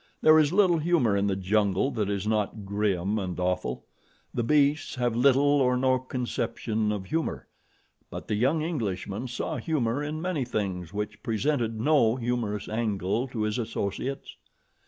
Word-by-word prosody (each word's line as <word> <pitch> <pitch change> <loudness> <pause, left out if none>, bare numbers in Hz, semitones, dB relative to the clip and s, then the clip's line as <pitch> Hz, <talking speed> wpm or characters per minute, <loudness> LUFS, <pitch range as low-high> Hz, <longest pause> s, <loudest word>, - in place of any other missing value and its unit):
There 155 0 +7
is 150 -1 +3
little 185 -3 +4
humor 155 -10 +2
in 100 0 +1
the 100 - +1
jungle 100 +5 +1
that 105 -5 -1
is 100 -1 -2
not 105 -1 -1
grim 100 0 0
and 90 -2 -4
awful. 90 -8 -2 0.5
The 120 - 0
beasts 145 +5 +2
have 120 -3 0
little 135 +3 +4 0.2
or 125 -1 +3
no 130 0 +2
conception 120 -4 -2
of 100 -2 -3
humor; 160 +8 -2 0.6
but - - -7
the - - -1
young 135 +9 +2
Englishman 115 - -3
saw 120 0 -3
humor 140 -5 -1
in 150 +1 -4
many 170 -4 -1
things 95 -8 -3
which 105 0 -4
presented 115 -1 -1
no 120 -3 +3
humorous 115 -4 -2
angle 110 +1 -1
to 115 -4 -3
his 105 +3 -1
associates. 115 +3 -4
115 Hz, 155 wpm, -27 LUFS, 105-135 Hz, 0.6 s, There